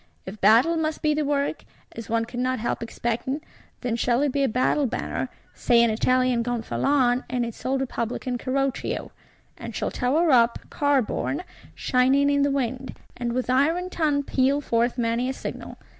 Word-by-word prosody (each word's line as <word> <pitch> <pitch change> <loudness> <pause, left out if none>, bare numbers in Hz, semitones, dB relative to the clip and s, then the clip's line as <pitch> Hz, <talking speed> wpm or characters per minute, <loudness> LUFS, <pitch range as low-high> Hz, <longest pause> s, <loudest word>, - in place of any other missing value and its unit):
If 195 +2 -9
battle 235 - +5
must 315 -1 -2
be 305 -1 +3
the 300 0 0
work, 285 +1 -1 0.3
as 230 -3 -9
one 230 0 +1
cannot 255 +2 -2
help 235 - -2
expecting, 240 +4 -2 0.4
then 245 -3 -1
shall 240 +3 +1
it 290 - +1
be 280 - 0
a 275 - +3
battle 255 +4 +1
banner 245 - -3 0.2
(say, 235 -2 +3
an 235 - +3
Italian 255 +2 +2
Gonfalon, 245 +2 +1
in 245 -1 0
its 230 - -8
old 265 +1 0
Republican 245 0 -3
Carroccio); 270 +1 -2 0.5
and - - -7
shall - - -2
tower 300 +6 +2
up, 235 -2 +4
car 285 -3 +2
borne, 285 +9 -3 0.3
shining 270 +3 +3
in 285 0 +2
the 285 - +3
wind: 260 -1 -3 0.2
and 240 -1 -3
with 255 0 -1
iron 320 +8 +1
tongue 295 -5 +1
peal 275 +1 +1
forth 235 -3 0
many 235 +1 0
a - - -1
signal. - - -7
255 Hz, 175 wpm, -25 LUFS, 235-280 Hz, 0.5 s, battle